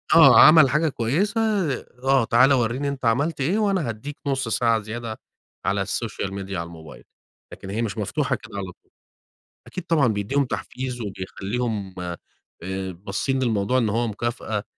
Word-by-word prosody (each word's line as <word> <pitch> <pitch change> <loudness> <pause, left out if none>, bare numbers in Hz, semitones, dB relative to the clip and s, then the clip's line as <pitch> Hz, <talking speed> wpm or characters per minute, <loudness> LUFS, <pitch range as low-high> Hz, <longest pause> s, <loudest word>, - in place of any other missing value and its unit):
آه، - - +9
عمل 155 -3 +8
حاجة 150 +3 +2
كويّسة، 170 - 0 0.6
آه، 135 -2 +4
تعالَ 130 +5 +5
ورّيني 125 +3 0
أنت 135 -3 -4
عملت 140 +7 +1
إيه 175 +10 +1
وأنا 195 - +1
هاديك 135 +7 -6
نص 135 -3 0
ساعة 115 0 +2
زيادة 110 +1 -6 0.5
على 100 0 +1
الsocial 110 -2 -3
media 100 0 -7
على 85 -2 -2
الموبايل، 80 -2 -12 0.5
لكن 95 - -9
هي 110 +4 -2
مش 115 -1 -3
مفتوحة 105 - -1
كده 100 - -10
على 100 - -3
طول. - - -27 0.8
أكيد 185 - -7
طبعًا، 155 -7 +3
بيديهم 110 +6 0
تحفيز 125 0 -5
وبيخليهم 100 +1 -4 0.7
آآ، 95 +1 -4
باصين 100 +9 -2
للموضوع 115 +1 +1
إن 115 -4 +2
هو 115 +2 0
مكافأة؛ 110 -2 -3
115 Hz, 155 wpm, -23 LUFS, 100-135 Hz, 0.8 s, آه